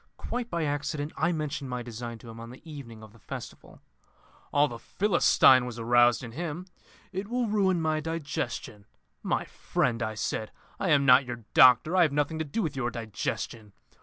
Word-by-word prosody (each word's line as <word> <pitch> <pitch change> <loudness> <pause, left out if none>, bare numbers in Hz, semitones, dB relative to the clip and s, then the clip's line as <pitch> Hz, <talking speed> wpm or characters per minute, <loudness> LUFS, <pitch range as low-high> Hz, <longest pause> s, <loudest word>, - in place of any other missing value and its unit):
Quite 245 -1 -4
by 170 -1 -1
accident 150 +1 -2
I 160 +3 +1
mentioned 150 -4 -3
my 125 -1 -3
design 120 0 -7
to 115 +1 -13
him 115 - -11
on 115 0 -8
the 130 +7 -14
evening 120 -8 -9
of 110 -1 -14
the 115 - -18
festival. - - -9 0.7
All 145 +1 +4
the 120 -4 -8
Philistine 130 - +4
was 120 -1 -7
aroused 120 +1 +4
in 115 - -7
him. 165 +5 -5 0.5
'It 190 +1 -4
will 245 +2 0
ruin 195 -4 +2
my 155 -1 0
digestion.' 145 -9 -4 0.3
'My - - -1
friend,' 120 -2 -1
I 110 -1 -2
said, 110 0 -3 0.3
'I 195 - 0
am 145 -3 +4
not 130 +1 +7
your 120 -3 -7
doctor; 130 +7 +6
I 185 - +5
have 155 -5 +3
nothing 150 +2 0
to - - 0
do 180 +10 -2
with 150 -4 -3
your 125 -3 -1
digestion. 110 -2 -5
140 Hz, 190 wpm, -28 LUFS, 120-160 Hz, 0.7 s, not